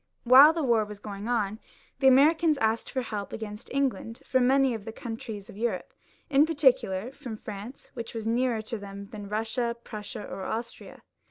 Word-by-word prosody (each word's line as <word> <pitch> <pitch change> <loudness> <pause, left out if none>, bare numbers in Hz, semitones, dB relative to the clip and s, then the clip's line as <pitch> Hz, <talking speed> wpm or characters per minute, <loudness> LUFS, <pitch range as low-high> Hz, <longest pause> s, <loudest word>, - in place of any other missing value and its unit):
While 265 +5 +9
the 325 -1 -2
war 235 -4 +3
was 210 0 -8
going 205 +1 -7
on 215 -3 0 0.4
the 270 - +4
Americans 305 +4 +5
asked 225 -2 0
for 260 -2 -2
help 210 -3 -5
against 210 -1 -7
England 265 -4 -2
from 255 -1 +2
many 270 -1 +4
of 220 -3 -5
the 225 - -6
countries 225 -3 -7
of - - -12
Europe, 235 +1 -2 0.3
in 290 +2 +4
particular 255 -8 +2
from 240 -5 -8
France, 215 +5 -9
which 235 -2 -7
was 225 -1 -4
nearer 235 -1 +1
to 220 +1 -5
them 200 0 -9
than 205 -2 -8
Eussia, 225 +3 -1
Prussia, 210 -1 -7
or - - -7
Austria. 225 +5 -6
230 Hz, 180 wpm, -28 LUFS, 210-260 Hz, 0.4 s, While